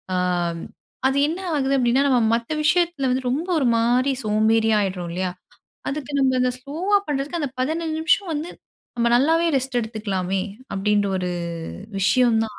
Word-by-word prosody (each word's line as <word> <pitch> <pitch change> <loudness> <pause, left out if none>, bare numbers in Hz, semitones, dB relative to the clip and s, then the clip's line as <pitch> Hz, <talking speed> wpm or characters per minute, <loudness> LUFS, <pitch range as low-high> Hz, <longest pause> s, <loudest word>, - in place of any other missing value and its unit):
ஆம், 175 -2 0 0.5
அது 270 +1 0
என்ன 330 +4 -3 0.2
ஆகுது 275 -1 +1
அப்டின்னா 255 +3 +3
நம்ம 255 -3 +3 0.2
மத்த 235 +4 -4
விஷயத்தில 330 -3 +2
வந்து 255 0 -1
ரொம்ப 300 +8 -1
ஒருமாரி 245 0 +2
சோம்பேறியா 220 +1 +2
ஆயிட்றோம் 185 -3 -3
இல்லயா! 185 +1 -2 0.6
அதுக்கு 290 -1 -5
நம்ம 260 -1 +3
இந்த 250 0 +2
ஸ்லோவா 330 +10 0
பண்றதுக்கு 290 +4 -2
அந்த 290 -3 -2
15 315 +3 -1
நிமிஷம் 345 +3 +2
வந்து 310 +4 -4 0.5
நம்ம 235 0 +2
நல்லாவே 325 +6 +3
ரெஸ்ட் 260 -1 0
எடுத்துக்கலாமே! 195 -4 -2 0.3
அப்டின்ற 205 +1 +1
ஒரு 180 -1 -2 0.7
விஷயம் 235 +3 +3
தான் 215 -2 -9
250 Hz, 150 wpm, -22 LUFS, 210-290 Hz, 0.7 s, அப்டின்னா